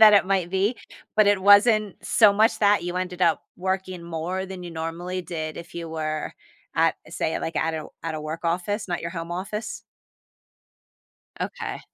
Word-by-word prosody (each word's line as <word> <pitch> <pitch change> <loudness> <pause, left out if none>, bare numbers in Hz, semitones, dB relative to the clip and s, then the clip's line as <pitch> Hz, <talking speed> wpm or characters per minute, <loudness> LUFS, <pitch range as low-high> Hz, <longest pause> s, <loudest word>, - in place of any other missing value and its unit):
that 215 -1 +10
it 200 - +6
might 190 -3 +1
be, 195 +6 +1 0.4
but 215 -1 +6
it 205 -2 +3
wasn't 205 0 +6
so 215 -3 +6
much 215 +3 +3
that, 205 -3 +4
you 175 +1 -3
ended 180 -1 -3
up 170 -3 +3
working 185 -1 -2
more 170 +3 -3
than 185 -1 -7
you 175 - -7
normally 170 +3 -4
did 160 -3 -5
if 170 - -9
you 170 -1 -5
were 155 -1 -3 0.4
at, - - +4
say - - -1
like, 165 - -4
at 165 0 +1
a 155 -1 -4 0.2
at 165 -1 -2
a 155 - -4
work 155 +3 -5
office, 190 +6 -1
not 175 -1 -2
your 170 - -4
home 170 -1 -5
office? 205 +5 -4 1.6
Okay. - - -4
180 Hz, 180 wpm, -25 LUFS, 165-200 Hz, 1.6 s, that